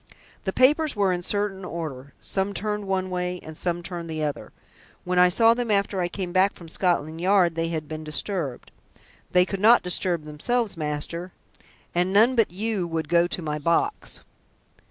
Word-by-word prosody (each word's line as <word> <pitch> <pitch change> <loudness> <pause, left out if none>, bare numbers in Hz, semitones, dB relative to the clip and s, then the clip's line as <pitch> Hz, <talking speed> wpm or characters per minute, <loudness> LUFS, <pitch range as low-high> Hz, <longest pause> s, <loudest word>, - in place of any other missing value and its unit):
"The 190 - 0
papers 290 +6 +3
were 195 -3 +2
in 175 - -2
certain 200 0 -2
order 150 -6 -6
some 195 +1 -2
turned 210 0 -2
one 185 -1 -1
way 180 0 -2
and 160 - -9
some 175 +1 -2
turned 170 -1 -5
the 155 -1 -3
other. 145 -1 -4 0.5
When 180 0 +1
I 180 0 +7
saw 225 +5 +5
them 240 -1 -3
after 200 -2 +1
I 175 - +1
came 180 0 -5
back 190 +2 +3
from 170 - -12
Scotland 165 -2 0
Yard 185 -2 +4
they 165 0 -1
had 160 -2 -3
been 155 0 -6
disturbed. 155 -3 -3 0.6
They 180 0 +5
could 195 0 -4
not 230 +3 +6
disturb 180 -2 0
themselves, 200 +9 -1
master, 165 +3 -4 0.6
and 180 +2 +1
none 225 +6 +5
but 225 -3 +3
you 200 0 -2
would 160 -2 -3
go 170 0 +4
to 175 - -2
my 150 -1 -2
box." 170 - -1
180 Hz, 180 wpm, -25 LUFS, 165-200 Hz, 0.6 s, I